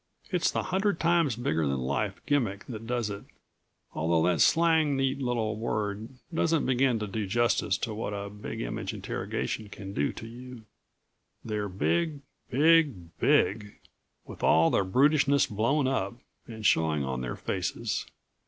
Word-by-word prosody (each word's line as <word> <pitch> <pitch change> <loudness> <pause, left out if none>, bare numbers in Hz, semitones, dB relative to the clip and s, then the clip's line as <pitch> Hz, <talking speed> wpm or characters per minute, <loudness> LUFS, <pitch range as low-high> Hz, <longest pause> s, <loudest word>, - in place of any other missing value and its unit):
It's 180 -3 +2
the - - -1
hundred 190 -1 0
times 170 -7 +2
bigger 80 -10 0
than 70 0 0
life 70 +10 -2
gimmick 110 -9 0
that 115 -2 -7
does 120 -3 -1
it, 100 - -6 0.7
although 80 +1 +1
that 85 -5 +2
slang 160 -4 +4
neat 135 0 0
little 115 -4 -1
word 110 -1 -3 0.2
doesn't 165 -1 +1
begin 130 -1 +2
to 105 - -3
do 105 0 -3
justice 115 -3 +1
to 110 - -3
what 105 -1 -4
a 100 0 -4
Big 105 0 -6
Image - - -4
interrogation 110 -2 -4
can 95 -1 -8
do - - 0
to - - -8
you. 120 0 -10 0.8
They're 105 -2 -2
big, 150 - 0 0.3
big, 140 - +3
BIG, 105 0 +2 0.5
with - - -11
all 80 +1 +4
the - - +3
brutishness 140 +7 +3
blown 125 +7 +1
up, 120 -5 -1 0.3
and 110 -2 -8
showing 80 -5 +3
on 65 -1 -3
their 60 -1 -4
faces. - - -3
110 Hz, 155 wpm, -28 LUFS, 100-135 Hz, 0.8 s, slang